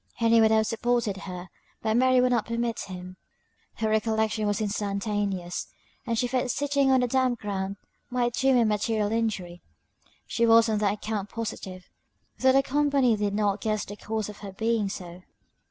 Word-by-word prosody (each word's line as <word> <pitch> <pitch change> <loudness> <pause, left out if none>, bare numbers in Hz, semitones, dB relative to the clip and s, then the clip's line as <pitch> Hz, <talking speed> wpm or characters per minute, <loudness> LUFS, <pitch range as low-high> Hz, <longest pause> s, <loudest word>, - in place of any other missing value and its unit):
Henry 230 0 +4
would 220 - +5
have 220 0 +3
supported 230 -2 0
her; 185 -1 -8 0.3
but 220 0 +1
Mary 255 +1 +4
would 250 0 +3
not 235 -3 +1
permit 230 0 -2
him; 185 -1 -8 0.6
her 220 - -1
recollection 220 0 +1
was 205 -1 0
instantaneous, 200 -3 -2 0.4
and 230 -1 0
she 245 - +1
feared 250 +1 -1
sitting 280 +1 +1
on 260 -1 +4
the 250 - +1
damp 255 0 +1
ground 195 -1 -3 0.3
might 245 -1 0
do 265 - 0
him 265 -2 +5
a 235 - +4
material 210 0 0
injury: 210 -6 -2 0.6
she 235 - -1
was 230 0 +6
on 215 -2 0
that 205 -1 +1
account 210 -1 -4
positive, 190 -5 -6 0.5
though 260 - +5
the 270 +1 +4
company 280 -4 +2
did 205 -1 -1
not 205 -1 0
guess 215 -1 -1
the 205 - -8
cause 215 0 -3
of 210 -1 -10
her 200 -2 -7
being 220 +1 0
so. 180 -2 -8
220 Hz, 180 wpm, -27 LUFS, 205-240 Hz, 0.6 s, was